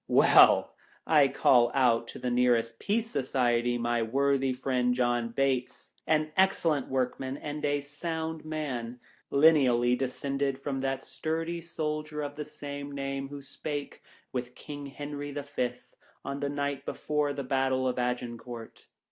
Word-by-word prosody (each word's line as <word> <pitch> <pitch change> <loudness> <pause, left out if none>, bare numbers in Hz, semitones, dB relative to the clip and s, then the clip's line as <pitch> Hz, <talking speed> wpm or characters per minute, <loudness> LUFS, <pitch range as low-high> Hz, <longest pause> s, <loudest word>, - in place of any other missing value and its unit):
Well! - - +6 0.3
I 150 -3 +5
call 120 -3 +4
out 120 -3 +2
of - - -9
the 125 - 0
nearest 120 -2 +2
Peace 225 +2 -1
Society 120 -3 +1
my 120 0 0
worthy 135 +3 +1
friend 125 -1 0
John 120 -2 +1
Bates 130 0 -1
— - - -47
an 155 0 +2
excellent 165 -7 +2
workman 130 +1 -2
and 150 0 -6
a 145 0 +1
sound 160 +2 -4
man, 130 -6 -4 0.3
lineally 130 -5 +5
descended 135 +1 -2
from 135 0 -3
that 135 0 -2
sturdy 165 +5 -3
soldier 155 -2 -3
of 145 0 -5
the 150 0 -5
same 145 -1 -7
name 135 0 -3
who 140 0 -9
spake 145 +1 -6 0.3
with 125 -1 -4
King 145 -1 -8
Henry 145 +1 -6
the 145 0 -5
Fifth, 140 -3 -4 0.3
on 140 0 -3
the 140 0 -1
night 140 -1 -2
before 150 0 -1
the 140 -1 -4
battle 130 0 +1
of 125 0 -1
Agincourt. 120 -1 -4
135 Hz, 150 wpm, -29 LUFS, 125-145 Hz, 0.3 s, Well